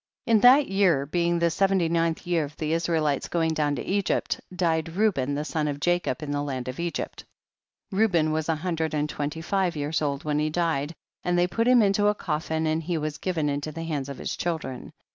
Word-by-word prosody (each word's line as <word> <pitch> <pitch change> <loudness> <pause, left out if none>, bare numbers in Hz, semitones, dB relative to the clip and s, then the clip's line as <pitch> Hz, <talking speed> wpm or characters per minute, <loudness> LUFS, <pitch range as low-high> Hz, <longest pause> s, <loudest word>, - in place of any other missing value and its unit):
In 230 -3 +4
that 260 +6 +7
year, 185 -8 +2
being 170 +3 +1
the 170 0 +2
seventy 195 -1 +2
ninth 165 0 0
year 175 -2 +1
of 145 +1 -12
the 155 0 -1
Israelites 160 -4 0
going 165 -2 0
down 150 -2 0
to - - -4
Egypt, 200 0 0
died 165 -2 -1
Reuben 160 -10 +1
the 150 +1 -2
son 155 -1 -1
of 145 -1 -3
Jacob, 175 -1 0
in 145 - -4
the 145 0 -1
land 130 -3 -4
of 130 +3 -5
Egypt; 170 0 -4 0.7
Reu 215 +2 +3
ben 155 -3 +2
was 155 +1 -1
a 160 - +3
hundred 160 -1 -2
and 150 0 0
twenty 150 +2 -4
five 185 0 0
years 150 +2 -1
old 140 -1 -1
when 150 -1 0
he 155 0 +1
died, 160 -2 -1 0.3
and 175 0 +1
they 175 - +4
put 230 +6 0
him 250 -2 +6
into 205 +1 +3
a 210 - +3
coffin, 160 -2 -2
and 155 +1 0
he 170 +1 -2
was 150 -1 -3
'given 165 -5 -1
into 145 +1 -2
the 165 +2 -6
hands 145 -4 -3
of 140 - -6
his - - -4
children. 155 -7 -4
160 Hz, 220 wpm, -26 LUFS, 150-175 Hz, 0.7 s, that